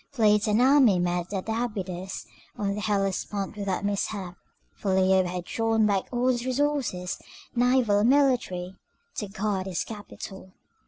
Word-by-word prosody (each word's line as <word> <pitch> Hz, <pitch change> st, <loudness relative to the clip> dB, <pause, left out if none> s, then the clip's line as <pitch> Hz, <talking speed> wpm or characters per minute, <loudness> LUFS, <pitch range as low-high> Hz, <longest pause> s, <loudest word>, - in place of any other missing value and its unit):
Fleet 215 Hz, -5 st, +3 dB
and 210 Hz, +1 st, +3 dB
army 255 Hz, -6 st, +6 dB
met 175 Hz, 0 st, -1 dB
at 195 Hz, -1 st, -3 dB
Abydos 195 Hz, -5 st, -3 dB, 0.3 s
on 200 Hz, -1 st, -1 dB
the 210 Hz, -, -4 dB
Hellespont 200 Hz, -1 st, -1 dB
without 200 Hz, -1 st, -2 dB
mishap, 200 Hz, -2 st, -2 dB, 0.4 s
for 195 Hz, -2 st, -1 dB
Leo 190 Hz, 0 st, +4 dB
had 180 Hz, 0 st, -4 dB
drawn 225 Hz, +2 st, +1 dB
back 200 Hz, -2 st, +1 dB
all 245 Hz, +1 st, +1 dB
his 240 Hz, -2 st, +1 dB
resources, 255 Hz, -9 st, -1 dB, 0.4 s
naval 245 Hz, -4 st, +3 dB
and 220 Hz, +4 st, +3 dB
military, 245 Hz, -10 st, +1 dB, 0.4 s
to 210 Hz, -, -2 dB
guard 195 Hz, -1 st, -2 dB
his 185 Hz, -3 st, -1 dB
capital. 195 Hz, -3 st, -9 dB
205 Hz, 145 wpm, -27 LUFS, 190-235 Hz, 0.4 s, army